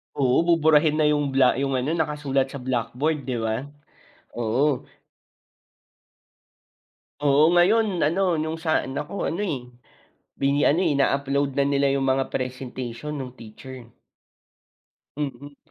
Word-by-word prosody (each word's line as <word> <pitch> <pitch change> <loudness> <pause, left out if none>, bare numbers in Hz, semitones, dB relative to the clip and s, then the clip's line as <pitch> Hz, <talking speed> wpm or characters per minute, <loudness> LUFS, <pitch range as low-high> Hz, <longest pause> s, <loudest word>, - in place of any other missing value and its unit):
Oo, 130 -3 +2
buburahin 155 -2 +4
na 155 -1 +2
yung 145 -1 +1
bla 130 -2 +4
yung 135 -1 0
ano 130 +4 -1
nakasulat 150 -4 0
sa 135 -1 -8
blackboard, 130 +4 -2
'di 125 -2 -2
ba? 115 +4 -2 0.7
Oo. 125 +4 0 2.3
Oo, 145 +2 +4
ngayon 190 +3 +3
ano 175 +1 +1
yung 160 +1 -3
sa 160 -2 +1
anak 145 +3 -5
ko 200 - -3
ano, 170 +5 -2
eh, 145 -12 -3 0.7
bini 140 +1 +1
ano, 170 +6 +3
ina-upload 140 -2 +1
na 140 - +2
nila 140 0 +2
yung 140 - 0
mga 135 0 +1
presentation 130 +1 -5
nung 130 -3 -5
teacher. 120 +2 -11 1.3
Mm. 145 0 -5
140 Hz, 125 wpm, -24 LUFS, 130-155 Hz, 2.3 s, buburahin